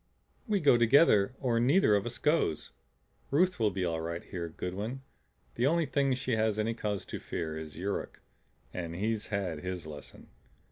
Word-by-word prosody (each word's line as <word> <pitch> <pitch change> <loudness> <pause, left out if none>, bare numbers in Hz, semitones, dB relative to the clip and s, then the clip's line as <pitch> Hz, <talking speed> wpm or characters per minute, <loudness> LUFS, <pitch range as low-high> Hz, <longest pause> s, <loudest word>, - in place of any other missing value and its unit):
"We 210 -2 +2
go 140 -7 +5
together 120 -3 +5
or 120 -3 +1
neither 130 - +4
of 100 +2 0
us 120 - -5
goes. 150 - +1 0.6
Ruth 180 +4 +2
will 110 -2 +3
be 95 -2 -2
all 80 -2 -1
right 85 +1 -4
here, 85 -3 -5
Goodwin. 105 +11 -5 0.5
The 120 +3 +1
only 165 +2 +2
thing 135 -1 +1
she 125 -1 -1
has 110 -1 +1
any 110 +1 0
cause 105 -3 -3
to - - -6
fear 80 -2 -4
is 80 -1 -7
Yuruk 100 +3 -3 0.5
and 85 -2 -5
he's 110 +3 -1
had 95 -6 -2
his 90 0 -5
lesson. 75 -3 -11
105 Hz, 175 wpm, -30 LUFS, 90-130 Hz, 0.6 s, go